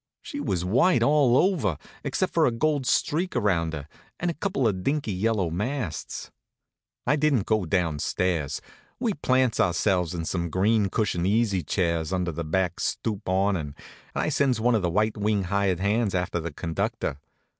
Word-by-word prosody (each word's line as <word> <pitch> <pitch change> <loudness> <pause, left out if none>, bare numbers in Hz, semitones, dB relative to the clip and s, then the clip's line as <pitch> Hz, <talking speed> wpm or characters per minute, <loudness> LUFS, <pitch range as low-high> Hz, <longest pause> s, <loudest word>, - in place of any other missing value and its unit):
She 285 - -6
was 90 - -1
white 125 - +3
all 140 -4 +4
over, 135 - +2 0.3
except - - -1
for - - +4
a - - +2
gold 145 +2 0
streak 175 +5 +1
around 90 -8 +1
her, 75 -2 -6 0.3
and 175 0 0
a - - -5
couple 155 - 0
of 95 -4 -1
dinky 140 -3 0
yellow 95 -3 0
masts. 105 - -4 0.7
I 150 - +3
didn't 145 -8 +2
go 110 -4 +1
down 80 -3 0
stairs. 80 -4 -1 0.4
We 235 -4 0
plants 130 -6 +1
ourselves 90 -1 +1
in 85 -1 -3
some 85 0 -2
green 100 +4 +2
cushioned 90 -4 0
easy 105 -2 +2
chairs 85 0 -1
under 90 -2 0
the 85 +1 -4
back 90 +3 -1
stoop 105 -4 -2
awnin', 95 -6 0 0.4
and - - 0
I - - 0
sends 130 -5 +2
one 120 +2 +3
of 110 - +2
the 90 - 0
white 105 +5 +1
wing 105 -1 +1
hired 95 -1 0
hands 100 +1 +1
after 90 -1 -1
the 85 0 -4
conductor. 80 -3 -3
100 Hz, 175 wpm, -26 LUFS, 85-120 Hz, 0.7 s, all